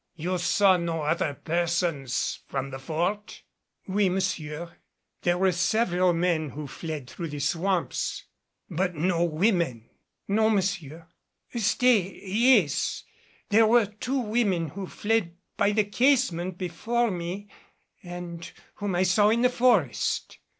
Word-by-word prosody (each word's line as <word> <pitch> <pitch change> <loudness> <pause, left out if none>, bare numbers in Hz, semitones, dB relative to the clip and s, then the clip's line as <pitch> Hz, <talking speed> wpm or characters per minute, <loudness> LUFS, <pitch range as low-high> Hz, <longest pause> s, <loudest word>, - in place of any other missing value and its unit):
"You 180 +3 -2
saw 190 +1 +4
no 165 -2 -2
other 150 -1 0
persons 170 -6 -1
from 135 0 -3
the 135 - -6
Fort?" 175 +9 -3 0.4
"Oui, 195 0 +2
monsieur. 170 -3 -3 0.4
There 175 0 +1
were 190 +1 +3
several 180 0 +2
men 165 -3 0
who 150 +3 -7
fled 150 -1 -6
through 170 +5 -6
the 145 -1 -6
swamps." 175 +5 -1 0.4
"But 180 0 -1
no 170 +2 +1
women?" 165 - 0 0.4
"Non, 220 +2 +3
monsieur. 170 -5 -2 0.5
Stay 225 -3 +2
yes, 210 - +2 0.5
there 220 +1 +5
were 235 0 +5
two 215 +6 -4
women 210 -8 0
who 190 +5 -6
fled 205 -5 -1 0.2
by 200 - +2
the 210 0 +2
casement 200 -6 +1
before 220 +7 -1
me 180 +3 -5 0.5
and 175 -1 -8 0.3
whom 205 -3 -2
I 180 - +3
saw 195 +3 +4
in 235 +2 +2
the 250 - +5
forest." 225 - +1
180 Hz, 130 wpm, -26 LUFS, 165-205 Hz, 0.5 s, there